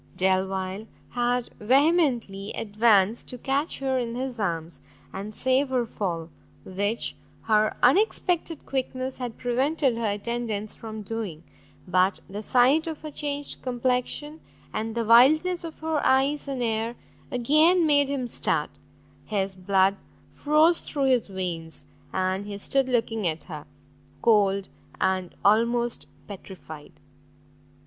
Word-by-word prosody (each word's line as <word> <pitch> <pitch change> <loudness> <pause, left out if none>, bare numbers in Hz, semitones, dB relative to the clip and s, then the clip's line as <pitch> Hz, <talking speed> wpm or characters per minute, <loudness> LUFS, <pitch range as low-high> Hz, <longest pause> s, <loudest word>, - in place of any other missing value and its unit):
Delvile 190 +2 0 0.2
had 245 0 0
vehemently 250 - +2
advanced 215 0 +2
to 250 - -5
catch 275 +5 -1
her 265 -1 0
in 235 -1 -3
his 255 -1 -4
arms 170 -4 -3 0.3
and 200 +2 -5
save 260 +5 +1
her 250 -2 +1
fall, 170 -7 -4 0.3
which 205 +4 -2 0.3
her 215 -1 +2
unexpected 345 - +2
quickness 260 -1 -3
had 245 -3 -5
prevented 260 +1 +1
her 230 -2 0
attendants 215 0 -3
from 220 -1 -8
doing; 200 -7 -5 0.4
but 185 +2 +2
the 205 +2 -6
sight 260 +8 +3
of 320 -1 -6
her 305 - -6
changed 290 -1 -4
complection, 255 +5 -2 0.3
and 225 +1 -3
the 230 -1 -1
wildness 310 +11 +5
of 325 -1 -7
her 315 -2 -1
eyes 275 +3 +2
and 265 -3 -2
air, 225 +1 -1 0.3
again 305 +8 +4
made 285 -2 +4
him 270 -3 -2
start, - - 0 0.5
his 195 -2 -1
blood 190 +1 +2 0.3
froze 310 +3 +3
through 280 -2 -2
his 255 -4 +2
veins, 175 -4 -5 0.3
and 190 +2 -1
he 205 -1 -5
stood 265 +6 0
looking 225 -4 0
at 160 -1 -2
her, 155 -4 -9 0.6
cold 200 -3 +3 0.3
and 185 -1 0
almost 235 +3 +2 0.2
petrified. 180 -6 -10
235 Hz, 125 wpm, -26 LUFS, 200-270 Hz, 0.6 s, wildness